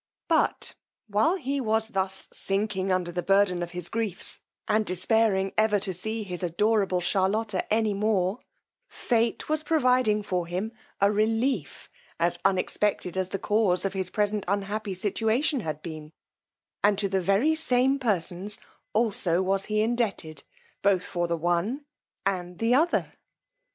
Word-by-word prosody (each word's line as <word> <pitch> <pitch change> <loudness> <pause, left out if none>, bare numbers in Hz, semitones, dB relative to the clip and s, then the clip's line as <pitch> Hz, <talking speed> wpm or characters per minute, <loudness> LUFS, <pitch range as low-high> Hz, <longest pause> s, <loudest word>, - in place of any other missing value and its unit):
But - - +1 0.3
while 215 - +2
he 280 -5 -2
was 220 -1 0
thus 190 -3 -2
sinking 195 -1 -1
under 180 -1 0
the 175 +1 -2
burden 195 -1 +3
of 175 - -3
his 175 -1 -5
griefs, 225 -5 -2 0.3
and 215 +1 +2
despairing 195 +1 +1
ever 215 -1 +3
to 190 -1 -2
see 220 +5 -3
his 180 -3 -5
adorable 190 +1 +1
Charlotta 200 +5 0
any 220 -1 +2
more, 200 0 +1 0.5
fate 230 -2 0
was 310 0 0
providing 255 -9 +2
for 180 -3 -2
him 185 +6 -3 0.3
a 200 +1 +4
relief 225 - 0 0.3
as 170 +1 +1
unexpected 190 -1 0
as 190 -1 -1
the 195 - -2
cause 205 -3 +2
of 195 - -1
his 190 -2 -2
present 210 0 0
unhappy 200 +1 -2
situation 225 - +1
had 155 - -5
been, 155 -2 -8 0.7
and 205 0 +4
to 200 0 +1
the 190 -1 0
very 200 - +3
same 270 -3 +2
persons 200 -3 -1 0.4
also 195 -5 +2
was 195 +1 0
he 215 0 0
indebted 215 - -2 0.4
both 195 -2 +2
for 175 -1 -1
the 170 0 -1
one 175 - -1 0.4
and 180 -2 -2
the 230 +2 +2
other. 320 +7 +2
200 Hz, 145 wpm, -27 LUFS, 185-225 Hz, 0.7 s, a